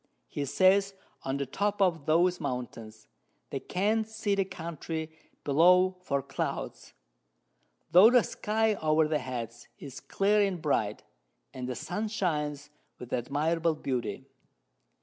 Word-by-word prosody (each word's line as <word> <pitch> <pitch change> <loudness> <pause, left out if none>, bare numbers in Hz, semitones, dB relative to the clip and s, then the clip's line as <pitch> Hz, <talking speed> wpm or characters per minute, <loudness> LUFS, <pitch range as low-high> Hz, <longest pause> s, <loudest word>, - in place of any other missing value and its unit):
He 145 - -3
says, 195 +7 +3 0.3
on 135 +1 -2
the 140 - -2
Top 205 +9 -2
of 170 -7 +1
those 175 +3 +3
Mountains 115 -3 -6 0.5
they - - -2
can't 215 +4 0
see 220 -2 -1
the 195 -1 +1
Country 160 -2 -6 0.3
below 180 +6 +4
for 140 -6 -1
Clouds, 135 - -5 1.0
tho' 185 +6 +8
the 245 -2 +5
Sky 220 +1 0
over 155 0 +3
their 155 -1 0
Heads 120 -3 -6
is 140 -3 -9
clear 205 +2 +1
and 195 -3 0
bright, 110 -9 -1 0.5
and 130 -1 -5
the 125 - -3
Sun 205 - -3
shines 150 -8 -2 0.3
with 125 - -9
admirable 155 +6 0
Beauty. 130 -5 -3
160 Hz, 130 wpm, -29 LUFS, 140-195 Hz, 1.0 s, tho